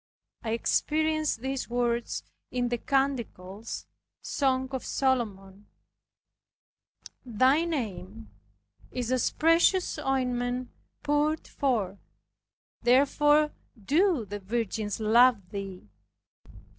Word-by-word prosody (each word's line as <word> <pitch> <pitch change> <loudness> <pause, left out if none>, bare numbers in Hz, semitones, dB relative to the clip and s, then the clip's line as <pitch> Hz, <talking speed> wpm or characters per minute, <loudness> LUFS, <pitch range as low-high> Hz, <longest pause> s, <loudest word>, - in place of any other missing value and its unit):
I 225 -1 -1
experienced 310 +2 0
these 265 -1 -3
words 240 -1 -1 0.3
in 245 -1 -1
the 240 -1 -1
Canticles 235 -7 -2 0.3
(Song 260 -2 0
of 265 -2 -4
Solomon): 205 -7 -1 1.6
"Thy 260 +7 +3
name 145 - -5 0.6
is 250 -1 -3
as 255 -2 +2
precious 335 +2 +3
ointment 250 -3 -1 0.3
poured 295 +1 +1
forth; 210 -8 -1 0.8
therefore 295 +4 +4 0.3
do 300 - +2
the 205 +1 -6
virgins 215 0 -2
love 220 -3 +4
thee." 195 - -6
245 Hz, 85 wpm, -28 LUFS, 215-280 Hz, 1.6 s, therefore